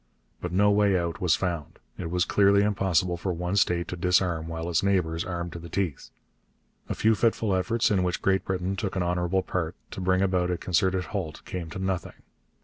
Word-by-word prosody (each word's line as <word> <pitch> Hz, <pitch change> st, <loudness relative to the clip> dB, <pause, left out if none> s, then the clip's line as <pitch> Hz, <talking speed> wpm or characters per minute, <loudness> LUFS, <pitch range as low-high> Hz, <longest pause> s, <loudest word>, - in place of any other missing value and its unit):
But 90 Hz, -, -4 dB
no 100 Hz, +3 st, +4 dB
way 100 Hz, -2 st, +3 dB
out 85 Hz, -1 st, -3 dB
was 85 Hz, -4 st, +4 dB
found. 85 Hz, -4 st, -3 dB, 0.2 s
It 85 Hz, -, -4 dB
was 90 Hz, +1 st, +1 dB
clearly 100 Hz, 0 st, +4 dB
impossible 95 Hz, -4 st, +1 dB
for 90 Hz, +2 st, -2 dB
one 90 Hz, +2 st, -2 dB
state 90 Hz, -3 st, +2 dB
to -, -, -3 dB
disarm 90 Hz, -2 st, +1 dB
while 80 Hz, 0 st, -4 dB
its 85 Hz, -2 st, +1 dB
neighbours 90 Hz, -5 st, +1 dB
armed 85 Hz, -2 st, -4 dB
to 85 Hz, -, -6 dB
the 85 Hz, +1 st, -10 dB
teeth. 85 Hz, -6 st, -2 dB, 0.8 s
A -, -, -1 dB
few 110 Hz, +1 st, +3 dB
fitful 110 Hz, -2 st, +1 dB
efforts, 115 Hz, +5 st, +1 dB
in 95 Hz, -3 st, +3 dB
which 90 Hz, 0 st, 0 dB
Great 95 Hz, 0 st, +2 dB
Britain 95 Hz, 0 st, -2 dB
took 100 Hz, -1 st, -3 dB
an 95 Hz, -, 0 dB
honourable 90 Hz, +1 st, 0 dB
part, 85 Hz, -1 st, -2 dB, 0.2 s
to -, -, -6 dB
bring 95 Hz, +1 st, +2 dB
about 90 Hz, -2 st, +1 dB
a 90 Hz, -, 0 dB
concerted 95 Hz, +1 st, +1 dB
halt 90 Hz, -7 st, -5 dB
came 90 Hz, -3 st, -5 dB
to 85 Hz, -, -7 dB
nothing. 95 Hz, -1 st, -3 dB
90 Hz, 205 wpm, -27 LUFS, 85-95 Hz, 0.8 s, no